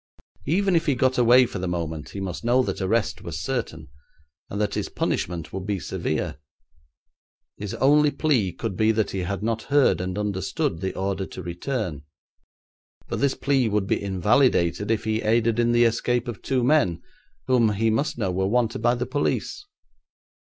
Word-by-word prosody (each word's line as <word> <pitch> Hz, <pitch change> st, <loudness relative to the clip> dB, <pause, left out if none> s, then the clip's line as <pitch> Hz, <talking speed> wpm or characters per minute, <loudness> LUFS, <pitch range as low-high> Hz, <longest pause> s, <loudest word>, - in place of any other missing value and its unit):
Even 190 Hz, +3 st, +2 dB
if 165 Hz, 0 st, +1 dB
he 140 Hz, -, +3 dB
got 130 Hz, +1 st, +1 dB
away 125 Hz, +1 st, +6 dB
for 115 Hz, -, -6 dB
the 90 Hz, -, -3 dB
moment 80 Hz, -3 st, -4 dB
he 100 Hz, -, -7 dB
must 95 Hz, 0 st, -5 dB
know 125 Hz, +2 st, +3 dB
that -, -, -3 dB
arrest 95 Hz, -2 st, 0 dB
was 80 Hz, -1 st, -5 dB
certain, 80 Hz, -8 st, -4 dB, 0.6 s
and 100 Hz, -, -4 dB
that 105 Hz, -1 st, 0 dB
his -, -, -2 dB
punishment 85 Hz, -2 st, -3 dB
would 95 Hz, +1 st, -5 dB
be 100 Hz, -2 st, -1 dB
severe. 70 Hz, -, -3 dB, 1.2 s
His 105 Hz, -1 st, -5 dB
only 150 Hz, +2 st, +4 dB
plea 135 Hz, -, +1 dB
could 95 Hz, +3 st, -5 dB
be 110 Hz, +3 st, +3 dB
that 110 Hz, -2 st, 0 dB
he 95 Hz, -, -3 dB
had 95 Hz, +3 st, -3 dB
not 115 Hz, 0 st, -1 dB
heard 145 Hz, -9 st, +3 dB
and 90 Hz, +1 st, -4 dB
understood 100 Hz, -, -2 dB
the 95 Hz, -, -3 dB
order 95 Hz, 0 st, -2 dB
to 95 Hz, -, -8 dB
return. 90 Hz, -, -3 dB, 1.1 s
But -, -, -2 dB
this 140 Hz, -1 st, +1 dB
plea 135 Hz, -4 st, +1 dB
would 105 Hz, -1 st, 0 dB
be -, -, 0 dB
invalidated 100 Hz, 0 st, +2 dB
if 115 Hz, -1 st, +1 dB
he 110 Hz, 0 st, -1 dB
aided 115 Hz, +1 st, +2 dB
in 120 Hz, 0 st, +3 dB
the 120 Hz, 0 st, +4 dB
escape 120 Hz, +1 st, +1 dB
of 120 Hz, -3 st, -6 dB
two 130 Hz, -2 st, 0 dB
men, 120 Hz, -, +2 dB, 0.4 s
whom 120 Hz, -4 st, +3 dB
he 110 Hz, +2 st, +1 dB
must 140 Hz, +6 st, -1 dB
know 100 Hz, -6 st, -1 dB
were 95 Hz, +1 st, 0 dB
wanted 115 Hz, +1 st, 0 dB
by 120 Hz, +1 st, +3 dB
the 125 Hz, 0 st, -2 dB
police. 150 Hz, -, -2 dB
110 Hz, 180 wpm, -24 LUFS, 95-125 Hz, 1.2 s, away